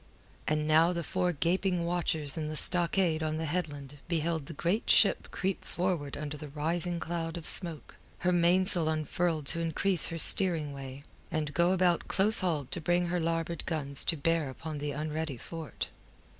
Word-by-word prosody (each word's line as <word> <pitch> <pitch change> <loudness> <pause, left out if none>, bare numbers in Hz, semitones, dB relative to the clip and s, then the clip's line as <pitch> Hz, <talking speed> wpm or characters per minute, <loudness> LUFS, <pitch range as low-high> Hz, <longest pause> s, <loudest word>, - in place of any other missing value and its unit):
And 150 0 -1
now 160 +3 +4
the 170 -1 -4
four 180 +1 -1
gaping 175 +2 -1
watchers 160 -4 -1
in 155 -2 -4
the 155 - -5
stockade 175 0 +2
on 155 0 -2
the 160 +1 -3
headland 145 -4 -5
beheld 160 -3 -2
the - - -8
great 175 +9 -2
ship - - +4
creep 190 0 -3
forward 175 -6 -3
under 150 0 -6
the 150 - -9
rising 170 +4 -2
cloud 165 0 -4
of 165 - -8
smoke, 170 -5 +4 0.3
her 180 - +3
mainsail 175 -1 +3
unfurled 155 0 -2
to 165 +4 +2
increase 165 +2 0
her 165 - -5
steering 165 -4 +6
way, 135 0 -9 0.3
and 155 -2 -3
go 175 0 +2
about 180 -2 +1
close 210 +3 +2
hauled 160 -8 -2
to 175 - -2
bring 175 +2 0
her 175 0 -1
larboard 165 0 -3
guns 140 -4 +4
to 165 - 0
bear 165 0 0
upon 150 +3 -7
the 145 0 -4
unready 155 -1 -4
fort. 160 +5 -7
165 Hz, 175 wpm, -29 LUFS, 150-175 Hz, 0.3 s, steering